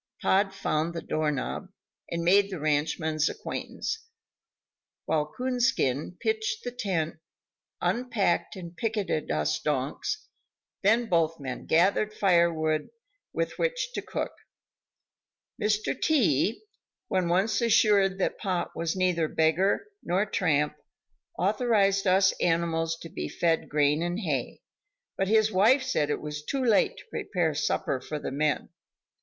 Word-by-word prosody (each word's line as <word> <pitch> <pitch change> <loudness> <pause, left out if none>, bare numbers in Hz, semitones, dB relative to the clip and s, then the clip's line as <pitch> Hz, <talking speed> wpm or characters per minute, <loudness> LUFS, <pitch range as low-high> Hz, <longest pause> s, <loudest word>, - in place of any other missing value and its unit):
Pod 195 +1 +2
found 170 -3 -1
the 165 - -3
doorknob, 155 +4 -2 0.4
and 170 0 -2
made 195 +3 +4
the 185 -4 -5
ranchman's 155 +1 0
acquaintance, 445 0 -5 1.0
while 150 -1 0
Coonskin 240 - 0
pitched 440 +1 -1
the 245 - -3
tent, 190 -10 -2 0.6
unpacked 235 -7 0
and 175 -2 -9
picketed 210 -9 -2
us 75 0 0
donks, 150 - -2 0.5
then 225 +4 +3
both 165 -4 +1
men 130 -3 -6
gathered 200 +5 +3
fire 170 -4 +4
wood 155 -1 -1 0.4
with - - -3
which - - -1
to - - -3
cook. - - -3 1.3
Mr. 210 0 +1
T, 230 - +2 0.4
when 185 -2 0
once 190 +7 +2
assured 205 -4 +4
that 195 - -1
Pod 185 -3 -1
was 165 +1 -2
neither 180 -3 +1
beggar 160 - +2 0.2
nor 185 +4 +1
tramp, 150 -7 +1 0.6
authorized 200 0 +2
us 190 +1 +4
animals 165 -1 +1
to 165 - -8
be 75 - -5
fed 165 -2 0
grain 150 +1 +2
and 175 +4 -2
hay; 145 - -3 0.5
but 195 - 0
his 220 +1 +3
wife 225 +8 +4
said 155 - 0
it - - -1
was 150 0 -5
too 270 - -2
late 220 -4 +3
to - - -11
prepare 175 -5 -1
supper 140 -3 -1
for 150 - -5
the 145 - -5
men. 150 +2 0
180 Hz, 130 wpm, -27 LUFS, 155-210 Hz, 1.3 s, made